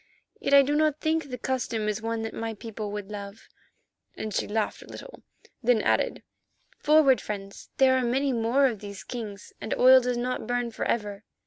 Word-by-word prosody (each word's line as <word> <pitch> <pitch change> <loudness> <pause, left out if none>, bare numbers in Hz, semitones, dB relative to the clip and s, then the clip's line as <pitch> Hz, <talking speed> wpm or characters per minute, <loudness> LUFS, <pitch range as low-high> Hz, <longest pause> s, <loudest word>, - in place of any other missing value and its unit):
"Yet 280 - +3
I 280 - +8
do 285 +2 -1
not 305 0 +2
think 315 -2 -1
the 250 - -5
custom 235 -3 -2
is 210 0 -2
one 225 0 -2
that 225 - -5
my 225 0 -4
people 215 -1 -6
would 205 -1 -6
love," 200 +1 -8 0.7
and 215 -1 -4
she - - -1
laughed 215 0 -2
a - - -13
little, - - -11 0.4
then 245 -1 +3
added, - - +1 0.6
"forward, 295 -3 +5
friends, 200 -1 -7
there 260 -1 +5
are - - -1
many 265 +3 +1
more 235 +4 +2
of 235 -6 0
these 200 -1 -8
kings 215 -5 -7
and - - -2
oil 255 +1 +7
does 250 0 -1
not 250 +1 -3
burn 245 -1 -1
for - - -4
ever." 210 -2 -2
235 Hz, 195 wpm, -27 LUFS, 210-260 Hz, 0.7 s, I